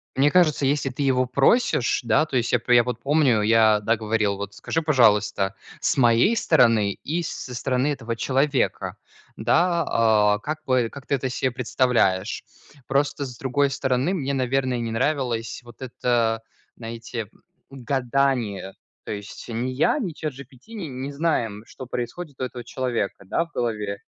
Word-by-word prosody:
Мне 140 Hz, +2 st, +4 dB
кажется, 155 Hz, -4 st, +3 dB
если 140 Hz, 0 st, +1 dB
ты 135 Hz, +3 st, -4 dB
его 130 Hz, -1 st, +2 dB
просишь, 135 Hz, -, +2 dB
да, 120 Hz, +7 st, +3 dB
то 140 Hz, -, -6 dB
есть 120 Hz, -1 st, +1 dB
я 125 Hz, -, +3 dB
п 120 Hz, -, +1 dB
э, -, -, +7 dB
я 120 Hz, -, +6 dB
вот 125 Hz, +1 st, -4 dB
помню, 140 Hz, -6 st, +3 dB
я, 110 Hz, -1 st, +5 dB
да, 110 Hz, +2 st, +1 dB
говорил: 105 Hz, -2 st, 0 dB
"Вот 100 Hz, 0 st, -6 dB
скажи, 165 Hz, -, -2 dB
пожалуйста, 105 Hz, -9 st, +3 dB, 0.2 s
с -, -, +1 dB
моей 120 Hz, -, +4 dB
стороны, 115 Hz, -, +3 dB
и 170 Hz, -, -3 dB
с -, -, -3 dB
со 125 Hz, -, -7 dB
стороны 130 Hz, +2 st, 0 dB
этого 115 Hz, -6 st, -3 dB
человека, 135 Hz, +2 st, 0 dB, 0.4 s
да, 170 Hz, +8 st, +2 dB
а, 105 Hz, -2 st, +3 dB
как 155 Hz, +8 st, -4 dB
бы 125 Hz, -3 st, +2 dB
как 140 Hz, -2 st, -11 dB
ты 140 Hz, -, +2 dB
это 130 Hz, -1 st, -2 dB
се 130 Hz, +1 st, 0 dB
представляешь?" 120 Hz, -5 st, +1 dB, 0.4 s
Просто, 140 Hz, +1 st, 0 dB
с 125 Hz, -3 st, -9 dB
другой 135 Hz, +3 st, +1 dB
стороны 135 Hz, +4 st, 0 dB
мне, 140 Hz, -7 st, -2 dB
наверное, 130 Hz, -1 st, 0 dB
не 115 Hz, -1 st, -3 dB
нравилось 125 Hz, -2 st, -1 dB
вот 120 Hz, 0 st, -15 dB
это, 120 Hz, -3 st, 0 dB, 0.3 s
знаете, 115 Hz, -1 st, -6 dB, 0.4 s
гадание. 130 Hz, -6 st, -1 dB, 0.3 s
То -, -, -4 dB
есть 105 Hz, 0 st, -8 dB
ни 120 Hz, +2 st, -2 dB
я, 130 Hz, -, +2 dB
ни 215 Hz, -, -2 dB
ChatGPT 140 Hz, -, -8 dB
н 155 Hz, -, -6 dB
не 140 Hz, -, -4 dB
знаем, 120 Hz, -9 st, -1 dB
что 130 Hz, -, -10 dB
происходит 130 Hz, +5 st, -6 dB
у -, -, 0 dB
этого 125 Hz, -1 st, -5 dB
человека, 120 Hz, -6 st, -3 dB
да, 165 Hz, -, 0 dB
в 165 Hz, -, -24 dB
голове. 105 Hz, -4 st, -2 dB
125 Hz, 170 wpm, -24 LUFS, 115-140 Hz, 0.4 s, э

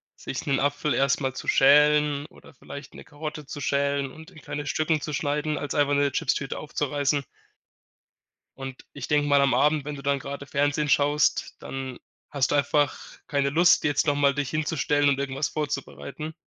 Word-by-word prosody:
sich 135 Hz, -, -6 dB
'nen 140 Hz, -3 st, +1 dB
Apfel 145 Hz, +1 st, 0 dB
erst 140 Hz, 0 st, +2 dB
mal 135 Hz, -2 st, -2 dB
zu -, -, -4 dB
schälen 150 Hz, +1 st, +5 dB
oder -, -, -18 dB
vielleicht 140 Hz, +1 st, -10 dB
'ne -, -, -10 dB
Karotte 150 Hz, 0 st, -7 dB
zu 140 Hz, -, -7 dB
schälen 140 Hz, 0 st, 0 dB
und 160 Hz, +6 st, -13 dB
in 165 Hz, -, -14 dB
kleine 145 Hz, 0 st, -6 dB
Stücken 155 Hz, +1 st, 0 dB
zu 150 Hz, -, -4 dB
schneiden, 150 Hz, +1 st, -1 dB
als 145 Hz, -, -4 dB
einfach 145 Hz, -1 st, +2 dB
'ne 140 Hz, 0 st, +3 dB
Chipstüte 135 Hz, +1 st, -1 dB
aufzureißen. 145 Hz, -1 st, -1 dB, 1.3 s
Und 135 Hz, -1 st, -8 dB
ich 140 Hz, -3 st, -6 dB
denke 150 Hz, 0 st, +2 dB
mal 140 Hz, -1 st, +4 dB
am 140 Hz, -1 st, +3 dB
Abend, 150 Hz, 0 st, +3 dB
wenn 150 Hz, 0 st, -4 dB
du 140 Hz, -, -10 dB
dann 140 Hz, 0 st, +1 dB
grade 140 Hz, +1 st, -7 dB
Fernsehen 145 Hz, +2 st, 0 dB
schaust, 145 Hz, +1 st, +2 dB
dann 130 Hz, -2 st, -6 dB, 0.3 s
hast 140 Hz, -3 st, 0 dB
du -, -, +2 dB
einfach 145 Hz, 0 st, +2 dB, 0.3 s
keine 140 Hz, -1 st, +1 dB
Lust, 170 Hz, +5 st, +4 dB
jetzt 145 Hz, -2 st, +1 dB
noch 145 Hz, -, +3 dB
mal 140 Hz, -1 st, +3 dB
dich 145 Hz, -3 st, -2 dB
hinzustellen 145 Hz, -2 st, +1 dB
und 140 Hz, -1 st, +1 dB
irgendwas 140 Hz, +1 st, -2 dB
vorzubereiten. 150 Hz, +1 st, -5 dB
145 Hz, 180 wpm, -26 LUFS, 140-150 Hz, 1.3 s, schälen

